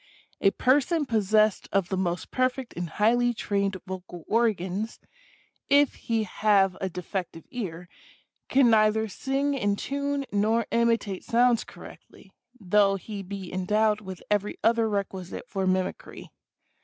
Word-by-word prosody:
A 195 - +5
person 290 - +2
possessed 215 -2 +2
of 195 -3 +1
the 190 - -1
most 180 -2 -2
perfect 255 0 -1
and 175 -1 -4
highly 240 +6 +2
trained 200 -2 -1
vocal 180 -2 -8
organs, 215 -2 0 0.7
if 285 0 +5
he 225 -1 -1
have 200 -2 +2
a 190 - -1
de 180 0 -7
fective 175 -3 -5
ear, 180 -8 -5 0.6
can 260 -3 +5
neither 220 0 +3
sing 275 +7 -1
in 205 -7 0
tune 280 +4 -2
nor 220 +3 +1
imitate 230 -5 +1
sounds 240 -1 +3
correctly, - - -14 0.3
though 200 0 +3
he 200 +1 -6
be 195 -1 -7
endowed 210 +3 +1
with 190 -3 -9
every 205 0 0
other 230 -1 +3
requisite 195 0 -4
for 190 -2 -2
mimicry. 185 0 -3
210 Hz, 135 wpm, -26 LUFS, 190-235 Hz, 0.7 s, A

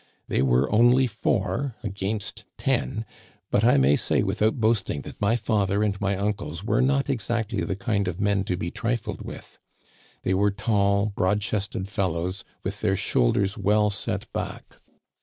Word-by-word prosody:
They - - +1
were 65 0 +3
only 120 +4 +5
four 125 +3 -1
against 105 +1 -3
ten; 125 -3 -1 0.5
but 105 - +3
I 120 - +5
may 70 +2 +5
say - - +1
without 110 +1 +1
boasting 110 -9 +1
that - - -11
my 105 +3 +3
father 105 -3 +1
and 100 -2 -1
my 100 -1 +1
uncles 100 -5 -3
were 105 +2 +2
not 140 +1 +2
exactly 115 -5 -1
the 95 - -2
kind 100 0 -1
of 90 +1 -3
men 100 -1 +2
to 90 - -1
be 85 0 -3
trifled 115 0 -2
with. - - -9 0.6
They 95 - +1
were 100 +2 +3
tall, 100 0 +1
broad 100 +2 +2
chested 100 -2 -2
fellows, 95 -2 -2 0.2
with 100 +2 -4
their 95 -3 +2
shoul - - +2
ders 100 +3 0
well 105 +1 +3
set 100 - -3
back. - - -6
100 Hz, 165 wpm, -25 LUFS, 95-110 Hz, 0.6 s, only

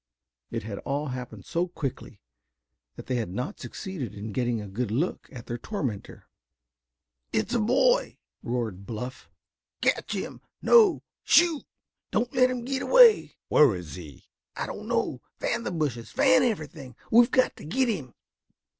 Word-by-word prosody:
It 115 -3 -4
had 100 -2 -6
all 145 +1 -2
happened 125 -1 -7
so 175 +1 -1
quickly 150 -7 -6 0.8
that - - -10
they 125 - -1
had 115 -6 -2
not 125 - -4
succeeded 175 - -6
in 105 +2 -6
getting 120 +1 0
a 105 - -6
good 110 +4 -3
look 140 - -2
at 125 -3 -9
their 120 -1 -5
tormentor. 130 - -5 1.0
"It's 110 - -1
a 240 - +2
boy!" 265 - +2 0.2
roared 110 -6 -3
Bluff. 125 +3 -6 0.5
"Catch - - 0
him. - - -5 0.2
No, 445 -6 +5 0.2
shoot! 340 -4 +4 0.4
Don't 235 +3 -1
let 255 -1 +4
him 250 -2 -4
get 265 0 -2
away!" - - +6
"Where 140 -9 +5
is 90 -3 -8
he!" 80 -7 -11 0.3
"I - - -3
don't - - -7
know. - - -1 0.2
Fan 235 - -1
the - - -3
bushes, 145 -9 -2
fan 260 0 +4
everything. 155 - -3 0.2
We've 235 +1 +7
got 255 - +2
to - - -11
get 255 - +1
him!" 150 - -3
145 Hz, 155 wpm, -27 LUFS, -, 1.0 s, We've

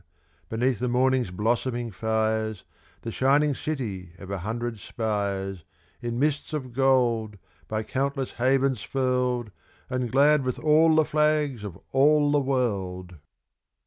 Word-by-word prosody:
beneath 120 +1 0
the 125 - -1
morning's 125 -1 +2
blossoming 120 +4 -1
fires, 110 0 -1 0.4
The 115 - -4
shining 140 +4 +3
city 105 - -4
of 95 0 -9
a 100 - -2
hundred 115 +3 -4
spires, 100 -5 -3 0.4
In 120 0 -3
mists 150 +3 0
of 130 -5 -4
gold, 120 -5 +2 0.3
by 110 0 -2
countless 135 +3 -2
havens 135 -2 +2
furled, 125 -3 -1 0.4
And 125 -2 -1
glad 145 +2 +4
with 125 -1 -2
all 155 +1 +4
the 155 -1 +4
flags 150 -6 +1
of 100 -5 -7
all 145 +2 +4
the 145 -1 +3
world! 95 -10 -2
125 Hz, 130 wpm, -26 LUFS, 110-135 Hz, 0.4 s, glad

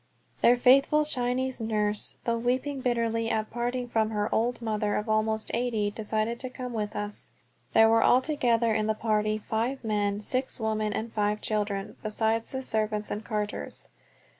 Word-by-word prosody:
Their 245 +1 +6
faithful 275 +4 +5
Chinese 255 -2 -1
nurse, 210 -1 -1
though 230 -1 0
weeping 260 +3 -1
bitterly 230 -2 0
at 215 -1 -1
parting 245 +1 -2
from 220 -2 +1
her 210 -1 -1
old 240 +2 +1
mother 215 -2 -1
of 210 - -2
almost 220 0 0
eighty, 225 -4 0
decided 220 +2 -2
to 255 - -3
come 250 -1 -6
with 210 -2 -3
us. 205 0 -2 0.4
There 225 0 +7
were 225 0 +4
altogether 245 -4 +3
in 215 0 0
the 220 - +1
party 215 -1 +1
five 230 +5 -2
men, 205 -2 0
six 255 +4 0
women, 215 -1 0
and 225 +2 -4
five 210 0 0
children, 205 -2 -2
besides 220 +1 -1
the 265 0 -4
servants 215 -3 -1
and 210 - -3
carters. 210 -1 -4
225 Hz, 165 wpm, -28 LUFS, 215-245 Hz, 0.4 s, There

